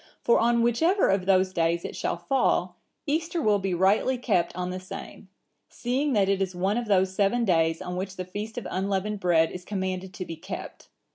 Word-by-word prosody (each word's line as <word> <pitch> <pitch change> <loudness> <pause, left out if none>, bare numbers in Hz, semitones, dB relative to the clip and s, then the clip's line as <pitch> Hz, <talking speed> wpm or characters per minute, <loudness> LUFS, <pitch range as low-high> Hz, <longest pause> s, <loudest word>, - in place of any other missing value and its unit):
For 235 - +4
on 235 0 +3
whichever 325 - +3
of 195 -1 +1
those 185 -1 +3
days 170 0 0
it - - -6
shall - - -2
fall, 180 -3 0 0.3
Easter 325 +3 -1
will 210 -8 +3
be 190 -2 -1
rightly 200 +8 +2
kept 200 -10 0
on 180 0 -3
the 185 - -4
same; 185 - -9 0.4
seeing 265 +4 -1
that 200 -3 +3
it 195 0 +1
is 185 -1 -2
one 195 +6 0
of 240 - -5
those 190 -2 +2
seven 210 +4 +2
days 165 -3 +2
on 180 - -5
which 190 +1 -4
the 185 - -5
feast 210 +5 -6
of 245 - -4
unleavened 195 +2 -1
bread 165 -3 +3
is 180 - -7
commanded 190 -1 -3
to 185 - -5
be 165 - -7
kept. 165 - -8
190 Hz, 205 wpm, -26 LUFS, 180-230 Hz, 0.4 s, For